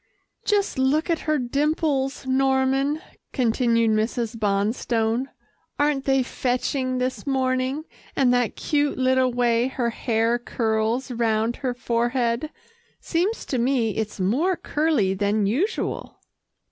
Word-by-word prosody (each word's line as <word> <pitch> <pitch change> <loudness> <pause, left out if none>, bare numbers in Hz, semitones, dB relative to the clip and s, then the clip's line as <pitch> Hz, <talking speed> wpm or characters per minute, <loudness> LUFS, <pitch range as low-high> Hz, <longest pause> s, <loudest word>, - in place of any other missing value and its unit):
"Just 405 -9 +1
look 295 +6 +2
at 330 - +1
her 305 - +3
dimples, 280 +1 0
Norman," 270 +3 +1 0.3
continued 230 -2 +2
Mrs. 225 +2 -1
Bonstone. 225 +3 0 0.5
"Aren't 290 -2 +1
they 270 -1 +3
fetching 255 +1 -1
this 255 +2 -3
morning, 260 +2 0 0.3
and 250 -2 +3
that 245 -2 +1
cute 290 -1 0
little 260 0 +3
way 240 0 +2
her 245 -3 -1
hair 230 +1 0
curls 230 +2 -1
round 225 -1 0
her 255 -3 -2
forehead? 240 +2 0 0.5
Seems 370 +7 -1
to 255 - -2
me, 240 -2 +1
it's 215 -1 -4
more 270 - +1
curly 300 - +1
than 205 +2 +1
usual." 310 - -2
255 Hz, 120 wpm, -24 LUFS, 230-275 Hz, 0.5 s, her